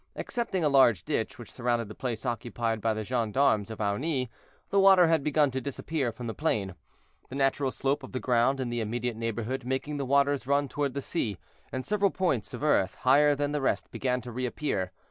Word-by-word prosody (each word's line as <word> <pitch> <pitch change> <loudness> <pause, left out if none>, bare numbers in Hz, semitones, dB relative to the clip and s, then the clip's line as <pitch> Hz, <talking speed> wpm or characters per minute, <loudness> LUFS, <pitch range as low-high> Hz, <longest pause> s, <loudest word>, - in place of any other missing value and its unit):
Excepting 225 -8 -2
a - - +4
large 130 - +4
ditch, - - -2
which - - -10
surrounded 120 -2 -1
the 110 - -8
place 120 -1 -4
occupied 120 -2 -2
by 110 0 +1
the 110 - -3
gendarmes 115 -2 +1
of 110 - -7
Aunis, 125 +6 -1 0.4
the 200 - +4
water 190 -2 +7
had 160 -3 +2
begun 150 -1 +2
to 130 +1 -3
disappear 140 -1 -2
from 120 +2 -8
the 115 - -3
plain, 105 - -1 0.6
the - - -7
natural 135 0 +1
slope 135 +2 -1
of 130 - -10
the 130 - -3
ground 125 +2 +2
in 125 -2 -2
the 120 -1 -1
immediate 120 +2 -2
neighborhood 115 +3 -3
making 130 +4 -2
the 140 - -2
waters 140 0 +2
run 140 0 +2
toward 140 0 -2
the 140 - -3
sea, 110 - -2 0.3
and 130 0 -4
several 205 -1 +2
points 175 - -1
of - - -6
earth, 95 -11 +2
higher 145 +3 +5
than 145 0 -1
the 150 -1 -1
rest, 135 - -1
began 125 -1 -1
to 120 +1 -8
reappear. 120 -6 -2
130 Hz, 205 wpm, -28 LUFS, 115-145 Hz, 0.6 s, water